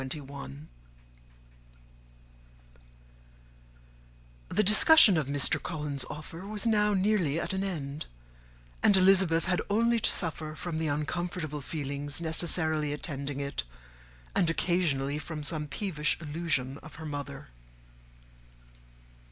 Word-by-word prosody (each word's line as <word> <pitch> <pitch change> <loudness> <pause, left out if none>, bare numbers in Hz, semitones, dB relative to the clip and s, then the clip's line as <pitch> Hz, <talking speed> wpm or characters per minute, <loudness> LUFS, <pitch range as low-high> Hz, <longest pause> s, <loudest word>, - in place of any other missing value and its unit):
The 215 - +1
discussion 215 - +8
of 155 -4 0
Mr. 140 0 +2
Collins's 150 -5 -2
offer 165 +5 -8
was 210 +1 -2
now 210 -2 +2
nearly 185 -6 +1
at 190 - -3
an 190 0 -1
end, 150 -6 -5 0.7
and 200 - +5
Elizabeth 185 -3 +4
had 180 -1 0
only 230 +3 +2
to - - +1
suffer 155 -3 -2
from 160 0 -4
the 160 - -1
uncomfortable 155 +1 -3
feelings 145 0 -4
necessarily 160 -2 +1
attending 140 -1 -4
it, 140 0 -3 0.7
and 170 - +2
occasionally 150 -5 0
from 150 0 -7
some 150 0 -2
peevish 155 -2 -1
allusion 150 -4 -2
of 155 - -13
her 160 - -9
mother. 140 - -6
160 Hz, 105 wpm, -29 LUFS, 145-185 Hz, 0.7 s, discussion